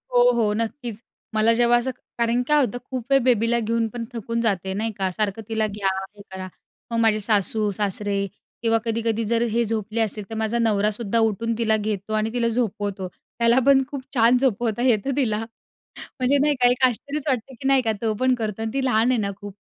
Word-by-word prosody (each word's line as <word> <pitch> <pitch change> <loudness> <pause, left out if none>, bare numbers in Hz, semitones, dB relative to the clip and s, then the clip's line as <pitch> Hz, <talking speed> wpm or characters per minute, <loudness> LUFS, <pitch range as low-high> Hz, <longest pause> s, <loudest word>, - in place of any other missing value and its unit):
हो, 245 0 +6
हो 220 -3 +1
नक्कीच. 230 -1 -4 0.3
मला 220 +1 +4
जेव्हा 240 +1 +4
असं 250 +2 -1 0.3
कारण 235 +1 +1
काय 300 0 +4
होतं 245 +1 -5
खूप 255 -3 -4
वेळ 275 - +6
बेबीला 235 -1 +2
घेऊन 230 0 0
पण 235 -1 -4
थकून 230 0 -3
जाते 190 -4 0
नाही 220 +3 -2
का, 190 -1 0
सारखं 210 +2 -2
तिला 220 -1 0
घ्या, 200 -1 -3 0.3
हे 205 - -13
करा. 190 0 -6 0.4
मग 230 - -1
माझे 220 -2 +3
सासू-सासरे 205 -1 +1 0.4
किंवा 225 -1 +3
कधी-कधी 230 0 0
जर 230 +2 +1
हे 235 +2 +2
झोपले 220 0 -2
असतील, 215 -1 -1
तर 225 - -6
माझा 220 +1 -1
नवरासुद्धा 215 0 +1
उठून 225 +1 0
तिला 220 -2 +2
घेतो 210 0 -3
आणि 215 +1 0
तिला 240 -1 +1
झोपवतो. 205 -5 -2 0.3
त्याला 235 +2 +4
पण 275 -1 +5
खूप 280 -2 -5
छान 240 0 +5
झोपवता 240 -3 0
येतं 250 +1 +2
तिला. 220 -7 +1 0.8
म्हणजे 260 +3 +3
नाही 290 +1 +2
का 245 - +7
एक 245 +1 0
आश्चर्यच 280 +4 -2
वाटतं, 260 -1 -1
की 260 +2 -5
नाही 270 -1 +4
का 225 -3 0
तो 225 -2 0
पण 255 0 +3
करतो 220 -2 -4
आणि 225 - -2
ती 270 - -1
लहान 240 0 +3
आहे 245 - +1
ना 200 -2 -1
खूप 205 -1 -8
225 Hz, 200 wpm, -23 LUFS, 210-240 Hz, 0.8 s, का